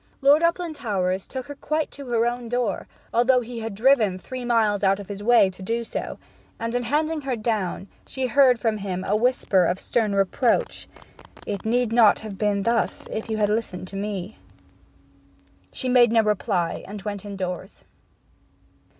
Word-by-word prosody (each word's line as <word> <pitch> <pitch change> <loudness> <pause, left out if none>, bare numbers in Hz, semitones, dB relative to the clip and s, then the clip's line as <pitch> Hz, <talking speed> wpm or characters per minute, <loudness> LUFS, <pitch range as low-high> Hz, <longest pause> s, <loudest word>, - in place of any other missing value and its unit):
Lord 285 +3 +5
Uplandtowers 245 - -1
took 260 -2 -6
her 285 - -7
quite 305 +2 -2
to 280 -2 -10
her 235 -1 +1
own 240 0 -2
door, 240 -5 -1 0.3
although 250 +2 +4
he 240 0 -7
had 225 -2 -5
driven 220 -4 +3
three 255 +7 -7
miles 220 -4 +1
out 195 0 +3
of 200 - -9
his 200 0 -6
way 220 -3 +5
to 185 - -14
do 230 +5 -2
so; - - -5 0.4
and 230 +1 -3
in 245 - 0
handing 305 +6 0
her 270 -3 -2
down 215 -4 -2 0.2
she 265 -1 -3
heard 255 0 +5
from 225 -2 0
him 185 -2 -4
a 205 - 0
whisper 215 -5 +2
of 180 +2 -1
stern 215 -4 0
reproach: 200 +5 +1 0.6
'It 200 -2 -4
need 235 0 +1
not 230 -3 +6
have 210 -3 -8
been 205 -2 +1
thus 230 +1 0
if 220 - -4
you 220 - -1
had 210 -1 +2
listened 210 -4 -2
to 195 - -10
me!' 200 0 -4 1.3
She 260 - -4
made 245 -2 +5
no 225 -1 +4
reply, 205 -4 -1
and 205 +1 -7
went 205 -2 -5
indoors. 190 -2 -6
225 Hz, 175 wpm, -24 LUFS, 200-245 Hz, 1.3 s, not